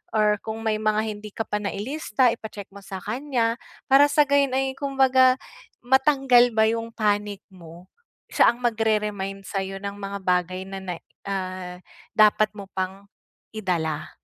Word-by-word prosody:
Or 210 -1 +3
kung 220 0 -6
may 215 -1 0
mga 215 0 +1
hindi 210 -1 -6
ka 225 - -4
pa 210 - -2
nailista, 230 +4 0
ipa-check 215 -4 -9
mo 200 - -10
sa 195 0 -7
kanya, 235 0 -1 0.3
para 280 +2 +7
sa 295 +1 +4
gayon 280 -2 +2
ay 270 0 +1
kumbaga, 265 -2 +3 0.5
matanggal 265 -2 +4
ba 220 - +4
yung 230 +1 -1
panic 205 -2 -1
mo. 170 -1 -13 0.5
Siya - - +5
ang 235 - -1
magre-remind 210 -4 -1
sayo 195 0 -3
ng 200 +1 -5
mga 200 0 -4
bagay 180 0 0
na 195 0 -7
ne 180 -3 -6 0.3
ah, 185 -2 -4 0.4
dapat 215 0 +5
mo 200 - -7
pang, 190 +1 -4 0.5
idala. 165 -7 -2
215 Hz, 150 wpm, -24 LUFS, 195-245 Hz, 0.5 s, para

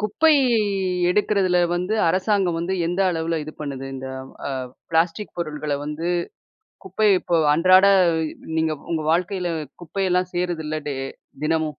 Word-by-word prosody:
குப்பை 215 +10 +3 0.8
எடுக்கிறதுல 195 -2 +2 0.2
வந்து 180 +4 -1
அரசாங்கம் 185 -1 +1
வந்து, 170 +3 -2
எந்த 175 +3 -1
அளவுல 165 -1 -1
இது 155 - -8
பண்ணுது 135 -3 -5
இந்த 130 0 -6 0.4
அ - - -3 0.4
ப்ளாஸ்டிக் 165 +5 0
பொருள்கள 150 -3 -3
வந்து, 150 +3 -4 0.8
குப்பை 200 +3 +1
இப்போ 170 - 0 0.2
அன்றாட 185 +4 +6 0.7
நீங்க 160 -1 +1 0.2
உங்க 160 - -1
வாழ்க்கைல 180 +1 0 0.3
குப்பையெல்லாம் 180 +1 0
சேருதுல்ல, 160 -3 -2
டே 140 - -3 0.5
தினமும்? 155 -2 -1
175 Hz, 120 wpm, -22 LUFS, 160-185 Hz, 0.8 s, அன்றாட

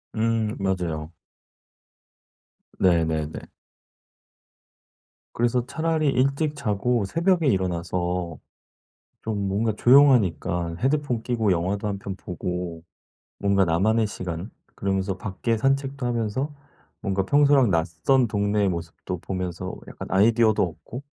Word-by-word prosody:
음. 115 -1 0
맞아요. 85 -5 -2 1.7
네네네. 80 -4 +1 1.9
그래서 120 +1 +1
차라리 160 +2 0
일찍 140 +4 +1
자고 120 -2 0
새벽에 170 - +1
일어나서 90 - -1 0.8
좀 105 -3 -2
뭔가 105 +3 0
조용하니까 105 - +4
헤드폰 135 -1 0
끼고 115 -5 +1
영화도 95 +4 -1
1 100 -1 -3
편 100 -1 -6
보고 90 -2 -5 0.6
뭔가 100 -1 +3
'나만의 110 +7 +2
시간.' 90 0 -5 0.2
그러면서 95 0 -1
밖에 110 +4 -2
산책도 135 +1 0
하면서 120 +5 -2 0.5
뭔가 95 -2 -1
평소랑 140 0 +4
낯선 85 +10 +2
동네의 105 -1 +1
모습도 85 +1 -5
보면서 90 0 -4
약간 - - -8
아이디어도 110 +3 +4
얻고 90 - -5
100 Hz, 245 characters per minute, -24 LUFS, 90-125 Hz, 1.9 s, 조용하니까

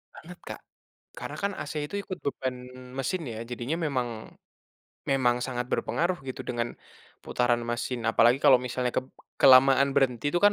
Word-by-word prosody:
Banget 175 +3 -12
Kak. - - -7 0.6
Karena - - -7
kan 200 0 -1
AC 145 - -6
itu 200 - -7
ikut 185 -2 -6
beban 130 -2 -2 0.4
mesin 165 +6 -2
ya 115 -4 -6
jadinya 125 +6 -3
memang, 130 -4 -1 1.0
memang 125 -3 +2
sangat 125 -1 -3
berpengaruh 175 +1 0
gitu 130 - -5
dengan, 120 -1 -2 0.5
putaran 120 -1 +1
mesin 120 0 -3
apalagi 115 +2 +5
kalau 135 - +6
misalnya 125 0 -2
kep 130 +1 -1 0.3
kelamaan 135 +1 +7
berhenti 135 0 +2
itu 175 - -1
kan 205 +1 +5
130 Hz, 155 wpm, -27 LUFS, 120-145 Hz, 1.0 s, kelamaan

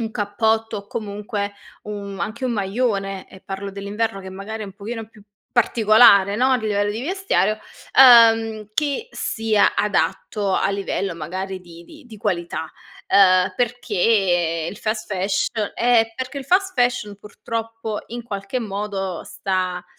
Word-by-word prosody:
un 225 -1 -3
cappotto, 220 +1 0
o 200 - -11
comunque 205 -1 -4 0.3
u 210 - -7 0.3
anche 230 +4 -4
un 250 - 0
maglione, 195 -2 -1
e 190 - -14
parlo 195 +1 -6
dell'inverno, 200 +1 -3
che 190 - -9
magari 210 +3 -6
è - - -4
un 195 - -10
pochino 220 +2 -6
più 215 -2 -18 0.3
particolare, 215 -3 +5
no? 255 +3 +3
A - - +4
livello 205 -2 0
di 225 +4 -4
vestiario, 325 - 0 0.4
uhm, 225 -4 +7
che 300 - -1
sia 220 -2 +1
adatto 205 -1 0
a - - +1
livello 195 -2 -2
magari 185 +4 -5
di 170 -1 -14
di 310 - -15
di 225 - -12
qualità. 170 -4 -3 0.4
Uhm, 185 -2 +5
perché 195 -8 +1
il - - -10
fast 215 -1 -3
fash 195 +1 0 0.3
Eh, 230 -2 +3
perché 260 +2 -5
il 275 - -7
fast 380 +6 +2
fashion 245 -5 0
purtroppo, 225 +1 -5
in 240 +1 -6
qualche 205 +2 -4
modo, 195 -4 -4
sta 185 -2 -2
210 Hz, 145 wpm, -21 LUFS, 195-230 Hz, 0.4 s, uhm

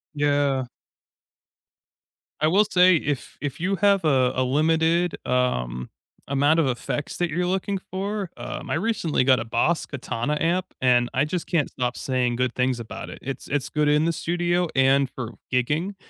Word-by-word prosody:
Yeah. 145 -2 +1 1.8
I 155 - +4
will 195 +6 +4
say 185 -3 +5
if 145 -3 -3
if 140 -1 -4
you 190 +4 0
have 200 -1 +3
a 130 -4 +3
a 130 - +1
limited, 160 +5 +2
um, 65 - -1 0.4
amount 145 +3 +3
of 160 -4 +3
effects 130 +3 -3
that 175 -1 0
you're 180 +3 -1
looking 190 +2 -1
for, 200 +1 -3
um, - - -6
I - - 0
recently 175 - 0
got 130 -2 +5
a - - -5
Boss 120 +9 +1
Katana 140 +1 -3
amp, 175 +3 +1 0.2
and 125 -1 +3
I 130 +2 +2
just 170 +2 -3
can't 160 -5 +1
stop 125 -1 -3
saying 125 -2 -1
good 125 -1 0
things 125 -1 0
about 110 -1 -7
it. - - -9
It's 135 0 -6
it's 145 -2 -2
good 150 -1 +1
in 150 +1 +3
the 170 - +1
studio 175 +2 0
and 135 0 +4
for 120 -3 -6 0.2
gigging, 150 +10 0
145 Hz, 170 wpm, -24 LUFS, 130-175 Hz, 1.8 s, say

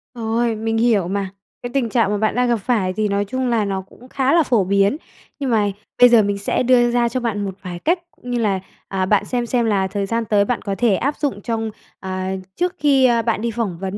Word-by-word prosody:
Rồi, 230 0 0
mình 225 +1 -2
hiểu 225 -6 +2
mà, 195 0 -2 0.3
cái 245 - -5
tình 265 -4 0
trạng 225 -4 +2
mà 210 - 0
bạn 215 +1 0
đang 250 0 +2
gặp 240 - +3
phải 205 -4 0
thì 215 +2 0
nói 200 0 0
chung 255 +5 -2
là 225 -3 +1
nó 195 -1 -2
cũng 240 +6 -18
khá 270 0 +1
là 335 -1 +5
phổ 235 -7 +2
biến. 200 +6 +2 0.4
Nhưng 275 -2 -2
mà 210 -3 +2 0.3
bây 245 - +8
giờ 235 -2 +6
mình 200 0 -1
sẽ 200 - -1
đưa 240 -1 +4
ra 240 -1 +2
cho 255 +2 -2
bạn 215 -4 -2
một 190 -1 -5
vài 180 -2 -6
cách 345 - +1
cũng 245 - -10
như 245 - 0
là, 200 -4 +1 0.3
à, 190 -1 -1
bạn 200 +1 +2
xem 245 -1 -2
xem 240 0 0
là 200 -3 +1
thời 200 +1 -2
gian 230 +3 -1
tới 205 -1 +2
bạn 245 - -1
có 200 -1 -3
thể 230 -5 +3
áp 280 +7 -1
dụng 275 -9 -2
trong, 225 0 -3 0.3
à, 185 0 -3 0.2
trước 360 +1 -1
khi, 275 -3 +4
a, 235 -2 +3
bạn 225 -2 -1
đi 235 0 -1
phỏng 215 -6 -3
vấn 195 +1 -4
225 Hz, 260 wpm, -20 LUFS, 200-245 Hz, 0.4 s, bây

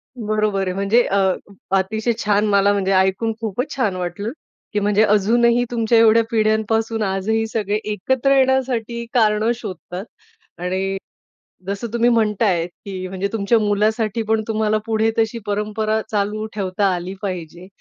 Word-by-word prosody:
बरोबर 215 -3 0
आहे. 180 - -1
म्हणजे 200 +5 +3
अ, 195 - -1 0.6
अतिशय 220 +5 0
छान. 210 0 +2
मला 200 0 +4
म्हणजे 195 -1 0
ऐकून 190 +4 +2
खूपच 230 +6 -3
छान 220 -8 0
वाटलं 180 +5 -4 0.4
की 210 - +1
म्हणजे 205 +1 +3
अजूनही 235 +4 +3
तुमच्या 230 -1 +2
एवढ्या 225 0 +6
पिढ्यांपासून 220 0 +1
आजही 205 +3 0
सगळे 210 -2 -2
एकत्र 260 +7 +1
येण्यासाठी 250 -3 +1
कारणं 215 -1 +3
शोधतात. 185 -3 -7 0.5
आणि, 190 +2 -2 0.7
जसं 200 +4 -3
तुम्ही 235 +1 +3
म्हणताय 210 -6 +2
की 185 +1 -8
म्हणजे 190 +1 -3
तुमच्या 225 +1 +2
मुलासाठी 215 +1 +1
पण 220 0 +1
तुम्हाला 215 -1 +1
पुढे 225 0 +1
तशी 225 +1 0
परंपरा 215 +1 -1
चालू 210 +1 -1
ठेवता 195 0 0
आली 180 +2 -5
पाहिजे. 180 -2 -6
215 Hz, 140 wpm, -20 LUFS, 195-225 Hz, 0.7 s, एवढ्या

